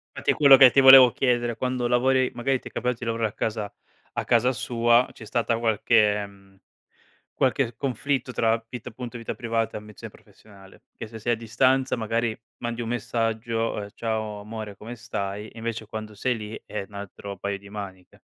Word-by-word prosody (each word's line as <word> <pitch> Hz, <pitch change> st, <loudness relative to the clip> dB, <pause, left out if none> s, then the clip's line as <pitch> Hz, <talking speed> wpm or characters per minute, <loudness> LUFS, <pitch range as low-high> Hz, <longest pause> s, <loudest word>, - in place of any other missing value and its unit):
Fatti -, -, 0 dB
è -, -, +3 dB
quello 140 Hz, -3 st, +7 dB
che 130 Hz, -2 st, +9 dB
ti 135 Hz, -, +4 dB
volevo 130 Hz, -2 st, +10 dB
chiedere, 120 Hz, -3 st, 0 dB
quando 125 Hz, -1 st, -1 dB
lavori 130 Hz, +1 st, +2 dB
magari 130 Hz, +2 st, 0 dB
ti -, -, -9 dB
è -, -, -21 dB
capitato 125 Hz, -1 st, -2 dB
di 120 Hz, -, -6 dB
lavorare 115 Hz, -1 st, -1 dB
a -, -, -19 dB
casa 105 Hz, -2 st, -3 dB, 0.4 s
a -, -, -2 dB
casa 120 Hz, +2 st, +3 dB
sua, 120 Hz, 0 st, +2 dB
c'è 110 Hz, -, -12 dB
stata 115 Hz, 0 st, -1 dB
qualche 105 Hz, -2 st, +2 dB
mhmm, 95 Hz, -1 st, -20 dB, 0.7 s
qualche 125 Hz, -3 st, 0 dB
conflitto 135 Hz, 0 st, -2 dB
tra 115 Hz, 0 st, +1 dB
vita 125 Hz, +1 st, -7 dB
appunto 120 Hz, 0 st, -8 dB
vita 115 Hz, -, -5 dB
privata 115 Hz, -2 st, -2 dB
e -, -, -5 dB
ambizione 105 Hz, -1 st, -11 dB
professionale? 100 Hz, -3 st, -18 dB
Che -, -, -7 dB
se 110 Hz, 0 st, -10 dB
sei 120 Hz, +2 st, 0 dB
a -, -, -7 dB
distanza, 130 Hz, +4 st, +1 dB
magari 115 Hz, 0 st, -1 dB, 0.2 s
mandi 120 Hz, 0 st, -4 dB
un 115 Hz, -, -5 dB
messaggio, 115 Hz, -2 st, -2 dB
ehm: 100 Hz, -, -8 dB
"Ciao 110 Hz, -2 st, -3 dB
amore, 105 Hz, -1 st, -7 dB
come 115 Hz, +4 st, -9 dB
stai?" 105 Hz, -2 st, -5 dB
Invece 115 Hz, -1 st, -5 dB
quando 110 Hz, 0 st, -7 dB
sei 125 Hz, +3 st, 0 dB
lì 110 Hz, 0 st, -7 dB
è 105 Hz, -2 st, -5 dB
un 100 Hz, -, -18 dB
altro 100 Hz, 0 st, -8 dB
paio 100 Hz, +2 st, -3 dB
di 100 Hz, 0 st, -15 dB
maniche. 95 Hz, -3 st, -9 dB
115 Hz, 190 wpm, -25 LUFS, 105-120 Hz, 0.7 s, volevo